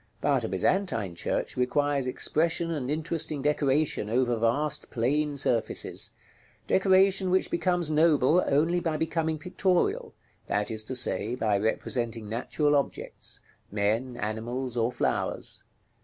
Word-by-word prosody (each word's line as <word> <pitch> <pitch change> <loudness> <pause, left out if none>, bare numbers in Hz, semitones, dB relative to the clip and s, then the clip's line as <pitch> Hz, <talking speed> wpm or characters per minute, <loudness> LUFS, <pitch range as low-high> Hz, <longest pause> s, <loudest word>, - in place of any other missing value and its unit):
But - - +1
a - - -1
Byzantine 115 - 0
church 85 - -3
requires 140 +1 0
expression 165 +5 +1
and 140 -5 -3
interesting 155 0 -1
decoration 145 -5 +1
over 120 +1 +1
vast 120 +7 0
plane 145 +5 0
surfaces, 120 -5 0 0.6
decoration 190 0 +3
which 185 +1 +2
becomes 175 -3 +1
noble 155 +1 +4
only 165 +5 +2
by 165 -2 -1
becoming 160 0 -1
pictorial; 180 +2 0 0.3
that 105 +2 -1
is 110 -1 -1
to 130 - -4
say, 120 -1 +1
by 110 -4 +1
representing 115 +1 -2
natural 145 +6 0
objects, 140 - -3 0.3
men, 110 +5 -1
animals, 120 +3 -3
or 115 0 +1
flowers. - - -2
145 Hz, 125 wpm, -27 LUFS, 120-160 Hz, 0.6 s, noble